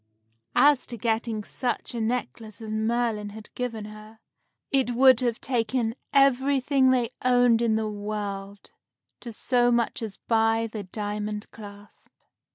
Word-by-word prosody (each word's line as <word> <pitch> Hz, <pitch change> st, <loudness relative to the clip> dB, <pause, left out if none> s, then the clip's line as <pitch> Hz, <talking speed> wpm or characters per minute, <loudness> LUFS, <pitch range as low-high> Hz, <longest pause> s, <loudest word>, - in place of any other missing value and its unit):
As 285 Hz, -2 st, +4 dB
to 235 Hz, -, -7 dB
getting 225 Hz, -1 st, -1 dB
such 245 Hz, +3 st, -3 dB
a 235 Hz, -, -3 dB
necklace 225 Hz, -2 st, -3 dB
as 220 Hz, -1 st, -6 dB
Merlin 220 Hz, -1 st, -1 dB
had 210 Hz, +1 st, -12 dB
given 230 Hz, -4 st, -4 dB
her, 215 Hz, +1 st, -12 dB, 0.5 s
it 260 Hz, -3 st, +1 dB
would 260 Hz, -1 st, +6 dB
have 240 Hz, -3 st, 0 dB
taken 235 Hz, -2 st, -1 dB, 0.2 s
everything 275 Hz, 0 st, +3 dB
they 245 Hz, -3 st, +2 dB
owned 245 Hz, -2 st, +4 dB
in 230 Hz, -2 st, +2 dB
the 220 Hz, 0 st, -1 dB
world 205 Hz, -1 st, -6 dB, 0.5 s
to 235 Hz, -, -8 dB
so 245 Hz, +2 st, +1 dB
much 235 Hz, -1 st, 0 dB
as 215 Hz, -3 st, -6 dB
buy 225 Hz, 0 st, +1 dB
the 220 Hz, -1 st, -6 dB
diamond 210 Hz, +2 st, -5 dB
clasp. 205 Hz, -1 st, -13 dB
225 Hz, 140 wpm, -26 LUFS, 215-245 Hz, 0.5 s, would